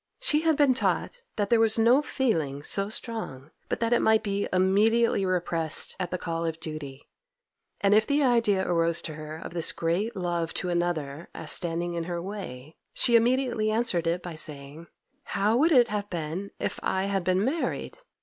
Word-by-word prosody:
She 300 -12 +3
had 320 -2 +2
been 285 -3 +5
taught 475 - -1
that 205 0 -2
there 235 - +5
was 225 0 +3
no 235 +5 +5
feeling 160 - -1
so 195 +5 -1
strong 215 - -5 0.2
but - - -2
that 230 +1 +2
it 240 - +3
might 220 0 +3
be 200 -1 -1
immediately 200 +3 +3
repressed 170 -3 +1
at 180 -2 -2
the 180 - -2
call 165 -1 -3
of 165 -1 -3
duty, 150 -4 -7 0.7
and 200 0 +4
if 215 +1 +4
the 285 +1 +2
idea 230 -7 +2
arose 170 -1 +1
to 155 - -4
her 155 0 -7
of 165 - -8
this 170 -2 +1
great 180 +8 -1
love 175 -3 -2
to 180 - -2
another 170 -4 -2
as 155 -2 -4
standing 175 0 -1
in 170 -1 -3
her 175 0 -3
way, 170 -7 -7 0.2
she 240 - +3
immediately 240 -2 +2
answered 215 -7 0
it 175 +2 -1
by 175 - -6
saying—'How 165 - -4
would 320 +6 +3
it 245 -5 +5
have 205 -1 -3
been 175 +3 -4
if - - -3
I 190 - 0
had 195 -1 -1
been 185 +3 +1
married? 315 - -2
190 Hz, 185 wpm, -27 LUFS, 165-230 Hz, 0.7 s, been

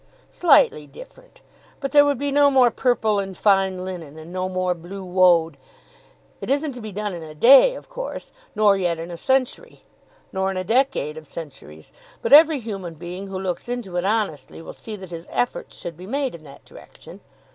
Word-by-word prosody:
"Slightly 275 - +3
different. - - -15 0.4
But 275 -2 -4
there 290 0 +7
would 285 -2 +1
be 285 +2 -2
no 285 0 +5
more 255 -3 +4
purple 220 -4 +1
and 195 -2 -5
fine 190 -2 +2
linen, 165 -5 -8
and 160 +2 -11
no 185 0 -2
more 185 -1 -1
blue 180 +3 -9
woad. 175 -4 +3 0.8
It - - -6
isn't 285 +2 0
to 245 -2 -9
be 215 -1 -7
done 205 0 -4
in 170 - -7
a 155 -1 -10
day 275 - +7
of - - -11
course, - - -7 0.2
nor 210 -2 +4
yet 175 -4 -1
in 165 +2 -7
a - - -6
century, 260 +7 -2 0.5
nor 190 0 -1
in 190 - -4
a 185 - -2
decade 225 - 0
of 155 -1 -11
centuries; 135 - -11 0.3
but - - +1
every 310 +1 +8
human 195 -8 -6
being 180 +4 -8
who 190 -1 -6
looks 185 +4 -4
into 240 -7 -5
it 175 - 0
honestly 205 -7 -2
will 165 - -10
see 220 - -8
that 190 -3 -11
his 165 0 -8
efforts 245 - -3
should 170 - -7
be 180 +2 -11
made 270 +2 -2
in 155 -2 -12
that 140 -1 -15
direction. - - -15
190 Hz, 200 wpm, -22 LUFS, 175-250 Hz, 0.8 s, every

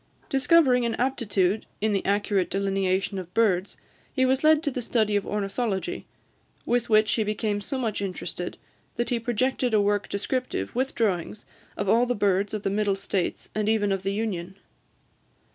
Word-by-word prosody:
Discovering 270 -3 +4
an 235 -1 0
aptitude 220 -6 0
in 215 0 +1
the 195 - 0
accurate 200 -2 +1
delineation 195 0 0
of 180 -1 -8
birds, 200 -4 +2 0.3
he 260 -2 +2
was 260 +2 +1
led 310 0 +5
to 290 - 0
the 250 - -3
study 220 -3 +1
of 205 - 0
ornithology; 210 - -2 0.6
with 240 0 0
which 215 -1 +4
he 220 - +2
became 210 -1 -1
so 270 +6 -4
much 225 -5 -2
interested, 180 -2 -4 0.4
that 240 +1 -1
he 240 - +1
projected 245 +1 0
a - - +5
work 205 0 +1
descriptive, 210 - -2
with 260 +2 -1
drawings, 205 -2 -1 0.3
of 200 - -2
all 235 +5 +4
the 245 - 0
birds 200 -1 +1
of 210 - -5
the 195 - 0
Middle 205 -1 +1
States, 195 -1 -2
and 215 0 0
even 210 -2 +2
of 195 -1 0
the 195 +1 -1
Union. 190 -4 -3
210 Hz, 175 wpm, -26 LUFS, 195-240 Hz, 0.6 s, led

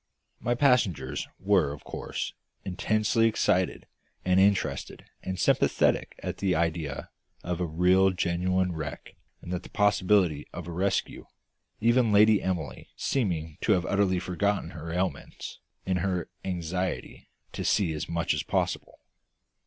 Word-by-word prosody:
My 120 +1 0
passengers 115 - +2
were 95 -7 +2
of 75 - -9
course - - -5 0.3
intensely 110 +4 +2
excited 95 -4 +1 0.4
and 90 0 +4
interested 100 0 +1 0.2
and 95 0 -4
sympathetic - - +2
at - - -3
the 95 -3 +1
idea 80 -3 -2 0.3
of 90 0 -3
a 90 - 0
real 90 +4 +4
genuine 90 0 0
wreck 80 -3 -6 0.3
and 90 - -5
the 90 - -1
possibility 100 -6 +2
of 90 -2 -6
a - - -5
rescue, 95 +4 -1 0.5
even 120 0 +4
Lady 105 0 +6
Emily 80 -10 -3
seeming 85 - -1
to 110 - +3
have 90 -4 +1
utterly 100 -1 +2
forgotten 90 0 -1
her 80 +1 -7
ailments 90 -4 -3 0.3
in 95 -1 +1
her 90 -1 -1
anxiety 90 0 -3 0.2
to - - -4
see 90 -6 +2
as 75 - -4
much 85 -1 0
as - - -1
possible. - - -2
90 Hz, 135 wpm, -28 LUFS, 85-100 Hz, 0.5 s, Lady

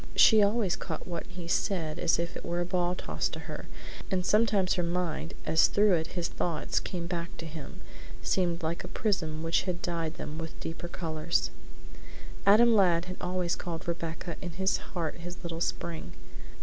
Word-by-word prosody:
She 220 -2 +8
always 205 -2 +3
caught - - -5
what 170 -2 -4
he 180 -2 -8
said 170 -3 0
as 165 - +3
if 170 +1 -2
it - - -6
were 175 0 -1
a 175 - +1
ball 180 0 +1
tossed 75 - -2
to - - -4
her, - - -7 0.4
and 185 -1 0
sometimes 210 -3 +4
her 180 - +1
mind, 170 -2 -1
as 160 +1 +5
through 205 -1 +4
it 160 -2 +2
his 170 -1 +1
thoughts 165 -3 -1
came 175 -3 -4
back 170 -1 -4
to 165 - -6
him, 155 -3 -8 0.4
seemed 175 -2 +1
like 165 +2 -1
a - - -5
prism 160 -7 -1
which 165 +1 +2
had 175 -1 -1
dyed 165 -2 -1
them 155 +2 -5
with 165 0 -6
deeper 165 +1 -5
colors. 160 - -1 1.0
Adam 230 +4 +8
Ladd 180 -2 +3
always 180 -1 0
called 170 -2 -5
Rebecca 170 0 -3
in 175 -2 -5
his 190 +2 +2
heart 170 -4 -4
his 175 +1 -7
little 165 -1 -4
Spring. 170 -1 -2
170 Hz, 180 wpm, -30 LUFS, 165-185 Hz, 1.0 s, She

